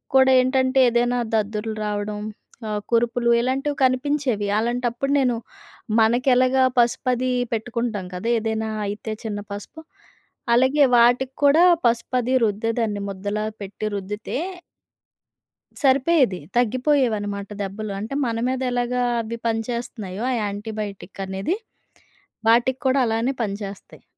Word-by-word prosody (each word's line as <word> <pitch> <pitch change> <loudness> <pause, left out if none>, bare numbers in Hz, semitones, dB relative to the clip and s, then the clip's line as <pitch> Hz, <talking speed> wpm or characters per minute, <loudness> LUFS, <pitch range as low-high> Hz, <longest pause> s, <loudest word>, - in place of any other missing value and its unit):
కూడా 265 0 +6
ఏంటంటే 260 +1 +2
ఏదైనా 240 +1 +1 0.2
దద్దుర్లు 215 0 -1
రావడం, 210 0 -3 0.5
ఆహ్, 210 -1 -2
కురుపులు 235 +1 +2
ఇలాంటివి 270 +4 -1
కనిపించేవి. 255 -4 0
అలాంటప్పుడు 240 +3 -1
నేను 250 -3 +1 0.6
మనకెలాగా 255 +3 +3 0.2
పసుపు 240 +1 +2
అది 255 +1 -1 0.2
పెట్టుకుంటాం 230 -3 -2
కదా! 180 +5 -4
ఏదైనా 220 0 -2 0.2
అయితే 210 +2 -4
చిన్న 205 -2 -3
పసుపు, 205 +10 -8 0.7
అలాగే 260 +4 +4
వాటికి 245 +2 +3
కూడా 300 +5 +6 0.2
పసుపది 240 +2 +1
రుద్దేదన్ని 220 0 -1
ముద్దలా 205 +2 -3 0.2
పెట్టి 200 +2 -6
రుద్దితే... 210 +4 -4 1.5
సరిపోయేది 270 - +3 0.2
తగ్గిపోయేవన్నమాట 230 -5 +1
దెబ్బలు. 200 +2 -4
అంటే, 220 +6 -5
మన 230 -2 -1
మీదెలాగా 250 -1 -1 0.2
అవి 230 +1 -6
పనిచేస్తున్నాయో 225 -3 -3
ఆ - - +1
యాంటీబయోటిక్ 205 -1 -5
అనేది, 195 - -2 0.9
వాటికి 245 +3 +3
కూడా 260 +1 +3
అలానే 225 +4 0
పనిచేస్తాయి. 200 -1 -7
235 Hz, 105 wpm, -23 LUFS, 210-255 Hz, 1.5 s, కూడా